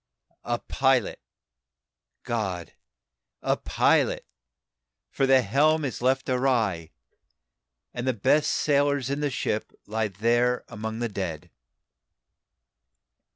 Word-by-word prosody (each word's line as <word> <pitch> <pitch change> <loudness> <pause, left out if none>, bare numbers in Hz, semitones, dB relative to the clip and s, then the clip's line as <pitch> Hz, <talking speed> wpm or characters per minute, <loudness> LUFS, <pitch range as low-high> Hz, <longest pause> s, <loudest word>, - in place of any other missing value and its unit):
A 120 0 0
pilot, 130 -2 +1 1.0
GOD, 95 -8 -3 0.7
a - - +2
pilot! - - +1 0.9
for 135 - +1
the 130 -1 +5
helm 150 +8 +2
is 130 - -4
left 130 +1 +1
awry, 115 -11 +1 1.0
And 120 +1 -4
the 130 - +2
best 145 +8 +2
sailors 140 -2 +1
in 140 - -1
the 145 -1 0
ship 110 -5 -2
lie 110 +1 -1
there 120 +5 +1
among 110 +2 -5
the 120 - -1
dead!" 90 -7 -5
120 Hz, 105 wpm, -26 LUFS, 105-135 Hz, 1.0 s, the